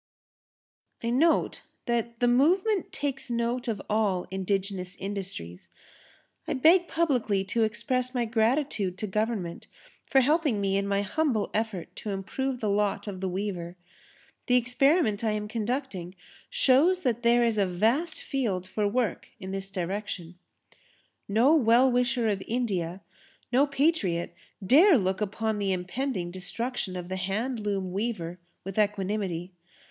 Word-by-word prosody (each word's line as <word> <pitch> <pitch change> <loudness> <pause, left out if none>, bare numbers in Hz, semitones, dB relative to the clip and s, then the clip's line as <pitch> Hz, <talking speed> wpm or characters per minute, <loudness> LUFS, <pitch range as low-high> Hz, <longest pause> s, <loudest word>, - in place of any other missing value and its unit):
I 230 - 0
note 320 +7 +2 0.2
that 235 0 -2
the 245 - +4
movement 360 - +3
takes 275 -3 -3
note 235 +1 -1
of 220 -4 -1
all 205 -4 +1
indigenous 190 -1 -2
industries. 190 - -6 0.8
I - - 0
beg 340 +6 +5
publicly 245 -12 +1
to 205 +4 -1
express 255 +3 0
my 240 -1 +1
gratitude 225 -4 0
to 215 - -3
Government 210 -4 -2 0.4
for 270 - +4
helping 295 -4 +2
me 195 -1 0
in 200 0 0
my 200 0 +1
humble 230 0 0
effort 215 -5 -3
to 215 - -5
improve 245 +7 -3
the 215 - 0
lot 205 0 0
of 195 -3 -6
the 190 - -1
weaver. 180 -2 -4 0.7
The 250 - +4
experiment 250 - +3
I 220 -1 +1
am 210 0 -3
conducting 215 -5 -3 0.3
shows 320 +8 +4
that 240 -5 0
there 240 0 +4
is 225 -2 +1
a 195 - +3
vast 230 - 0
field 210 -10 -1
for 205 +2 -1
work 240 +2 -1
in 190 -2 -6
this 195 0 -4
direction. 190 -2 -4 0.9
No 230 +9 +4
well 255 -2 +5
wisher 245 -1 +1
of 200 -2 0
India, 195 -7 -2 0.5
no 270 +4 +4
patriot 275 - 0 0.3
dare 320 - +7
look 190 -2 -1
upon 215 +1 -1
the 200 -1 0
impending 185 +1 -2
destruction 195 +2 -3
of 180 -1 -5
the 185 +1 -4
hand 215 +7 -2
loom 200 -3 -2
weaver 185 -4 -3 0.2
with 195 +2 -4
equanimity. 195 -3 -1
215 Hz, 140 wpm, -27 LUFS, 190-250 Hz, 0.9 s, dare